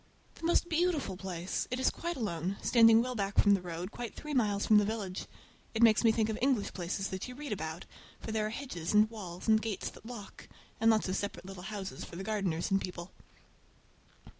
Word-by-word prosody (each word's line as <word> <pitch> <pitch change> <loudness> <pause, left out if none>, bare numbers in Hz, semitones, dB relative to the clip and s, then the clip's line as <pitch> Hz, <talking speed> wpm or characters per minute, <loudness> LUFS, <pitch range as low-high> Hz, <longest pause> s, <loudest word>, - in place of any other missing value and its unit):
The - - -8
most 345 - +3
beautiful 330 - +1
place! 180 -1 -3
It 250 - -2
is 260 - +3
quite 340 0 -4
alone, 190 -4 -2
standing 225 -1 +6
well 255 0 -3
back 200 -3 -2
from 205 - +6
the 195 - +2
road, 175 +2 -5
quite 240 -2 -6
three 300 0 -6
miles 210 -6 +2
from 215 -1 +7
the - - +3
village. 200 -3 -3 0.5
It 225 - +3
makes 220 -1 +6
me 225 - +6
think 220 -1 +1
of 220 -1 -3
English 255 -6 +1
places 185 +2 -3
that 190 +4 -4
you 250 - -8
read 290 -2 -6
about, 160 -4 -4 0.3
for 220 - -6
there 215 -1 0
are - - -3
hedges 215 - -4
and 210 +1 +7
walls 185 -5 -7
and 220 0 +5
gates 220 -3 -3
that - - -15
lock, 235 -5 -9 0.3
and 225 - +4
lots 220 -3 +3
of 185 - -1
separate 185 -4 -4
little 195 -1 -8
houses 195 0 -5
for - - -9
the 190 - -5
gardeners 195 -6 -1
and 195 0 +3
people. 180 0 -6
210 Hz, 215 wpm, -32 LUFS, 185-230 Hz, 0.5 s, from